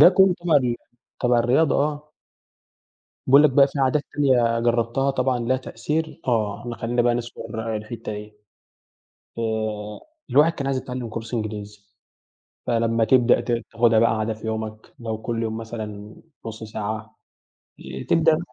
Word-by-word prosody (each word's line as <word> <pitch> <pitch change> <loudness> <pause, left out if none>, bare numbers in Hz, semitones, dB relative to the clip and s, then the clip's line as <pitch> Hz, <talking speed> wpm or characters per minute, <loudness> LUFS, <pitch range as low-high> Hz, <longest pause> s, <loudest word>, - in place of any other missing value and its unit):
ده - - +11
كله 190 -1 +6
تبع 170 -3 +3
ال 125 -3 +1 0.4
تبع 125 -1 +3
الرياضة 130 +6 +3
آه. 150 +1 -2 1.1
بيقول 140 +3 +7
لك 150 - +5
بقى 140 +1 +6
في 140 - -7
عادات 135 +3 +2
تانية 120 -5 +3
جربتها 120 +3 +1
طبعًا 130 -1 0
لها 120 +2 +1
تأثير؟ 155 +4 -3
آه، 115 0 -1
خلّينا 120 +1 0
بقى 120 0 +3
نذكر 115 -2 -4
الحتّة 110 +1 -6
دي 105 0 -8 1.0
آآ، 110 -2 -3 0.3
الواحد 150 +4 +5
كان 140 -4 -5
عايز 135 -1 0
يتعلم 125 -2 -5
كورس 115 +1 -6
إنجليزي، 105 -2 -5 0.9
فلمّا 115 -1 +2
تبدأ 125 +1 +4
ت - - -4 0.2
تاخدها 115 -1 +4
بقى 115 -1 +3
عادة 110 +1 -1
في 110 +1 -8
يومك 110 -1 -5
لو 110 -2 -4
كل 115 0 -2
يوم 110 0 -3
مثلًا 110 -2 -7 0.3
نص 110 0 -7
ساعة، 110 0 -5 0.6
ي - - -8
تبدأ 160 -1 +3
115 Hz, 150 wpm, -23 LUFS, 110-130 Hz, 1.1 s, ده